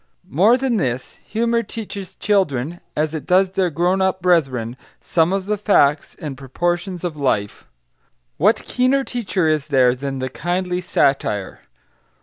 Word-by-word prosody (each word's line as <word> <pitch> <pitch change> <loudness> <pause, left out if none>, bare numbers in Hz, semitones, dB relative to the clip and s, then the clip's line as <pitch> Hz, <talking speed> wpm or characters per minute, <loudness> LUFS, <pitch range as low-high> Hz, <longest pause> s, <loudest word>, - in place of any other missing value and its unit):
More 205 - +5
than 260 -3 0
this, 125 - -3
humour 235 +1 0
teaches 200 -5 -7
children, 175 -6 0 0.2
as 155 +1 0
it 155 -4 -5
does 185 +1 +3
their 190 -2 +1
grown 175 +4 +1
up 190 0 +1
brethren, 135 -10 +1 0.2
some 165 +1 +1
of 195 -1 -1
the 210 0 -1
facts 150 -8 +2
and 150 -3 -6
proportions 175 +7 -2
of 175 -3 -3
life. 115 -8 -1 0.7
What - - +3
keener 255 +2 +1
teacher 205 -9 -1
is 155 -2 0
there 130 -4 +4
than 135 +1 -4
the 130 0 -3
kindly 180 +4 -2
satire? 135 - 0
175 Hz, 145 wpm, -20 LUFS, 140-195 Hz, 0.7 s, More